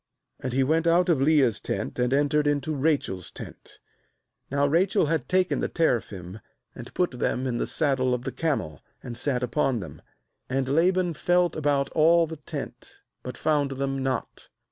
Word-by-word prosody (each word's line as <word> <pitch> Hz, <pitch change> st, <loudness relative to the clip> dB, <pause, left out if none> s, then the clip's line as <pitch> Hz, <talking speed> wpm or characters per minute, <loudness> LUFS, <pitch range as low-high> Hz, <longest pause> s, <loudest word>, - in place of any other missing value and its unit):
And 130 Hz, -, -4 dB
he 135 Hz, +2 st, +2 dB
went 160 Hz, +5 st, +1 dB
out 175 Hz, +2 st, +3 dB
of 155 Hz, -6 st, +3 dB
Leah's 140 Hz, -6 st, +3 dB
tent, 100 Hz, +5 st, -4 dB
and 125 Hz, 0 st, +1 dB
entered 145 Hz, +2 st, +2 dB
into 145 Hz, +2 st, 0 dB
Rachel's 140 Hz, -, -1 dB
tent. -, -, -11 dB, 0.7 s
^Now 140 Hz, +1 st, +2 dB
Rachel 180 Hz, +5 st, +2 dB
had 150 Hz, -4 st, -1 dB
taken 185 Hz, 0 st, +2 dB
the -, -, 0 dB
teraphim, 110 Hz, -, -1 dB, 0.3 s
and -, -, -10 dB
put 180 Hz, -1 st, +1 dB
them 125 Hz, +1 st, -1 dB
in 120 Hz, -2 st, -1 dB
the -, -, -1 dB
saddle 130 Hz, -5 st, +1 dB
of 125 Hz, -, -6 dB
the -, -, -3 dB
camel, 145 Hz, -, -2 dB, 0.2 s
and 120 Hz, -, -6 dB
sat 125 Hz, 0 st, -1 dB
upon 125 Hz, 0 st, 0 dB
them. 80 Hz, -6 st, -9 dB, 0.5 s
And 130 Hz, 0 st, -1 dB
Laban 175 Hz, +4 st, +2 dB
felt 175 Hz, +2 st, +1 dB
about 145 Hz, -2 st, 0 dB
all 165 Hz, +2 st, +4 dB
the 160 Hz, 0 st, -8 dB
tent, 145 Hz, -, -8 dB, 0.2 s
but 125 Hz, -, -7 dB
found 150 Hz, -3 st, +1 dB
them 135 Hz, 0 st, -2 dB
not. 130 Hz, -2 st, -4 dB
140 Hz, 170 wpm, -26 LUFS, 125-160 Hz, 0.7 s, all